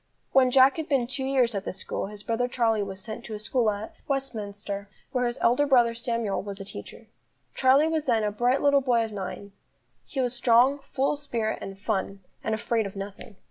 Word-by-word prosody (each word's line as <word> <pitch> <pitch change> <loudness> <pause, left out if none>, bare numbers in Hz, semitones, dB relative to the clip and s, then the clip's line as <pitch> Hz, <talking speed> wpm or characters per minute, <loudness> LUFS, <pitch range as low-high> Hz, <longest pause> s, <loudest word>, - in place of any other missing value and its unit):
When 260 -1 +5
Jack 265 +3 +6
had 320 -1 -4
been 270 -4 +2
two 265 +2 -4
years 260 -3 +2
at 200 -2 -2
this 185 - -5
school, - - -4
his 205 0 -10
brother 230 +3 0
Charlie 230 -3 +1
was 195 -1 -5
sent 220 +3 -7
to 220 - -5
a - - -6
school 225 +1 +1
at 210 +1 -4
Westminster, 205 -7 -4 0.2
where 250 -2 +1
his 240 - -3
elder 250 +5 +3
brother 240 -4 +5
Samuel 230 -3 -2
was 200 0 -7
a 195 - -7
teacher. - - -10 0.5
Charlie 270 +4 +4
was 315 -2 -1
then 225 -3 +3
a 210 - 0
bright 245 +6 +1
little 285 -1 +5
boy 240 -3 +2
of 220 - -8
nine; 200 0 -6 0.6
he 275 - -5
was 250 -2 +1
strong, 245 +3 +4
full 275 +2 +1
of 290 - -6
spirit 230 -7 -2
and 195 0 -7
fun, 195 -1 -2 0.2
and 220 - 0
afraid 225 -1 0
of 195 - -10
nothing. 200 +2 -7
235 Hz, 215 wpm, -27 LUFS, 205-260 Hz, 0.6 s, Jack